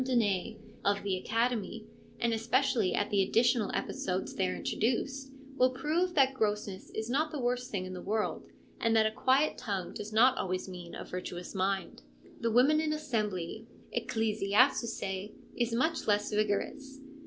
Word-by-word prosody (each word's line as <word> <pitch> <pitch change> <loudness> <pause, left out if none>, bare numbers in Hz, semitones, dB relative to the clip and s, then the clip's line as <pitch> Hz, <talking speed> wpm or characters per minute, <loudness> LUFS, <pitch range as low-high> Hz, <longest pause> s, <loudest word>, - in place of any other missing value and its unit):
Donnay, 225 -4 +1 0.3
of 200 0 +1
the 195 -2 0
Academy, 225 +1 -1 0.3
and 235 -1 +1
especially 230 -2 +2
at 205 +2 0
the 200 -1 +4
additional 230 +2 +3
episodes 185 0 -2
there 90 0 0
introduced, 260 - -1 0.3
will 255 0 +5
prove 310 +8 0
that 270 -2 +5
grossness 210 -5 -2
is 220 0 -2
not 295 +6 +1
the 305 - -4
worst 250 0 -1
thing 185 -3 -2
in 185 - -6
the 180 - -6
world, 215 +2 -2 0.3
and 230 0 +2
that 220 -1 +5
a 220 - +2
quiet 265 +6 +2
tongue 200 -7 -3
does 210 +1 -6
not 250 +4 +5
always 185 0 -2
mean 180 -2 -8
a - - -6
virtuous 180 -1 -6
mind. 190 - -1 0.4
The 230 - 0
Women 270 +7 +5
in 310 -1 0
Assembly, 220 - -2 0.3
Ecclesiazusce, 215 -2 +1 0.2
is 240 -1 0
much 290 +8 0
less 210 0 +1
vigorous. 215 +7 -1
220 Hz, 155 wpm, -31 LUFS, 200-255 Hz, 0.4 s, will